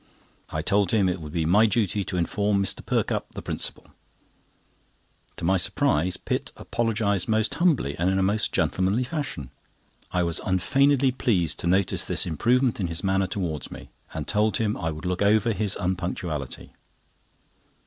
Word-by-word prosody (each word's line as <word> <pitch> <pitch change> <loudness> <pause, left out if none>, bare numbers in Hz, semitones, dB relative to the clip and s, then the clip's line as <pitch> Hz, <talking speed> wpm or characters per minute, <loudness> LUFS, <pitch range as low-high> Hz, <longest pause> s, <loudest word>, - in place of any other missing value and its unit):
I 80 - -3
told 100 0 +2
him 100 -3 +3
it 90 -1 -2
would 75 -1 -8
be 80 -1 -1
my 105 +7 +5
duty 105 -2 0
to 90 - -3
inform 100 +4 +1
Mr. - - 0
Perkupp, - - -1
the - - -5
principal. - - -3 1.5
To - - -4
my 95 +3 +3
surprise, 90 0 +1
Pitt - - -3
apologised 105 -5 0
most 110 0 +1
humbly 150 - +1
and 90 +2 +2
in 95 - +1
a 95 - +2
most 105 +3 +1
gentlemanly 95 +6 +1
fashion. 125 - -5 0.6
I 90 -1 +1
was 85 -1 0
unfeignedly 135 +8 +3
pleased 90 - 0
to - - -2
notice 95 +2 +2
this - - 0
improvement 120 - +1
in 95 - 0
his 85 0 -2
manner 95 0 +1
towards 90 -5 -3
me, - - -10 0.2
and - - -5
told 105 0 +1
him 110 -3 0
I 80 - -2
would 80 +2 -7
look 90 +1 -2
over 110 +3 +3
his 100 0 -1
unpunctuality. 90 -6 -4
95 Hz, 165 wpm, -25 LUFS, 85-110 Hz, 1.5 s, my